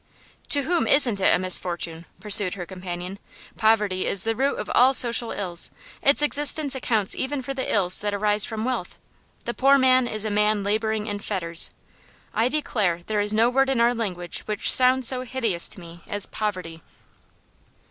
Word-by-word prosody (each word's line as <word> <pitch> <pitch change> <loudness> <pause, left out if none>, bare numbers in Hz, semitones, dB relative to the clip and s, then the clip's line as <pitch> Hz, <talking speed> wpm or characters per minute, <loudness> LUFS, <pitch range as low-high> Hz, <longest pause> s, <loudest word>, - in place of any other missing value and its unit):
'To 285 -1 +4
whom 340 +4 -1
isn't 245 -8 +4
it - - +3
a - - +3
misfortune?' 175 -2 -1
pursued 205 -3 +5
her 180 -3 -7
companion. 180 +1 -8 0.4
'Poverty 210 -4 0
is 195 - 0
the 225 0 -2
root 275 +3 -1
of - - -6
all 260 +2 +4
social 235 -2 +5
ills; 180 -3 -1 0.3
its 280 +2 +3
existence 295 0 +1
accounts 225 -6 -1
even 275 +2 -4
for 275 +2 -5
the 265 -1 -4
ills 185 -3 +3
that 205 0 -3
arise 205 0 +1
from 220 0 -4
wealth. 255 0 -5 0.5
The 240 - -4
poor 275 +2 +3
man 255 -1 +2
is 215 -1 -4
a 215 - -3
man 210 0 0
labouring 215 +1 -2
in 205 -2 -5
fetters. 170 -5 -1 0.6
I 225 - +1
declare 210 - -2
there 215 -1 -2
is 205 0 0
no 220 +2 +2
word 270 +1 +1
in 265 -3 -1
our 235 +1 +2
language 180 -7 -4
which 210 -1 0
sounds 255 -1 +3
so 255 0 0
hideous 235 -9 +1
to - - -7
me 170 -1 -13
as 205 -1 +1
"Poverty." 185 -6 -6
215 Hz, 180 wpm, -23 LUFS, 190-255 Hz, 0.6 s, pursued